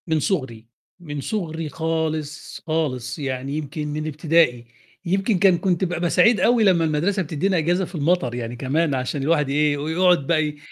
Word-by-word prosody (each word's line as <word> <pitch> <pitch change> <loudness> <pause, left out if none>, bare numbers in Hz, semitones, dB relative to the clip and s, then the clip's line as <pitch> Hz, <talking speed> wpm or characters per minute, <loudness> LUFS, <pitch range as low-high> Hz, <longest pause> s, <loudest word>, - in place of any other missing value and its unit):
من 160 -1 +1
صُغري، 130 - -2 0.3
من 145 -4 -6
صُغري 165 -4 -3
خالص، 160 -1 -3
خالص، 130 -6 -2
يعني 135 +1 -3
يمكن 150 0 -5
من 155 +1 -4
ابتدائي، 155 -5 +2 0.4
يمكن 195 +3 +1
كان 190 -2 +5
كنت 180 0 0
بابقى 175 -1 -1
سعيد 225 +2 +4
أوي 235 +3 +3
لمّا 180 -5 +4
المدرسة 170 +6 0
بتدِّينا 175 +4 -1
أجازة 175 +4 +1
في 175 - -11
المطر 150 -5 0
يعني 120 0 -5
كمان، 145 +5 0
عشان 130 +2 -3
الواحد 150 -2 +1
يإيه، 145 +1 +2
يقعد 160 0 +2
بقى 160 -2 +3
ي 150 0 -5
155 Hz, 170 wpm, -22 LUFS, 145-175 Hz, 0.4 s, كان